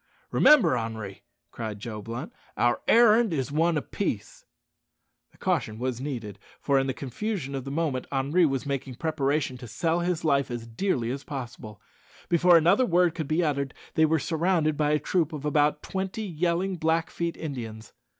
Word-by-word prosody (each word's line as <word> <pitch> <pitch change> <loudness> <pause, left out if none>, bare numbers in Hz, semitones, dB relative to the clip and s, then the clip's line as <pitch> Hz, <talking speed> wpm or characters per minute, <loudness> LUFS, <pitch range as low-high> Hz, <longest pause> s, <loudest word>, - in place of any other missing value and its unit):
"Remember, 300 - +6
Henri," 110 -4 -5 0.3
cried 110 -3 -5
Joe 105 0 -6
Blunt, 115 - -6 0.2
"our 120 0 +2
errand 230 -2 +5
is 140 -3 -2
one 165 +2 +2
of 150 - -5
peace." 115 - -3 0.9
The - - -24
caution 110 - -1
was 125 0 -3
needed, 115 -8 -5 0.2
for 140 -1 +2
in 135 - 0
the 130 - -1
confusion 145 - -4
of 135 -1 -4
the - - -5
moment 140 -3 -1
Henri 145 +6 +2
was 135 0 -2
making 135 -2 -3
preparation 145 -3 -1
to 120 - -9
sell 165 +9 0
his 175 -1 -1
life 140 -3 +2
as 120 -1 -5
dearly 120 - -1
as 135 +2 -5
possible. 120 - -7 0.5
Before 175 0 +6
another 175 +10 +4
word 175 -1 +3
could 160 -4 -4
be 160 +4 +1
uttered, 140 -3 -1 0.2
they 160 - +4
were 160 +1 +2
surrounded 160 0 +1
by 150 0 +1
a 150 - +3
troop 160 +2 0
of 150 -1 -6
about 150 0 +2
twenty 190 +3 -3
yelling 175 +2 -1
Blackfeet 165 +1 -1
Indians. 115 -8 -7
150 Hz, 170 wpm, -27 LUFS, 125-170 Hz, 0.9 s, Remember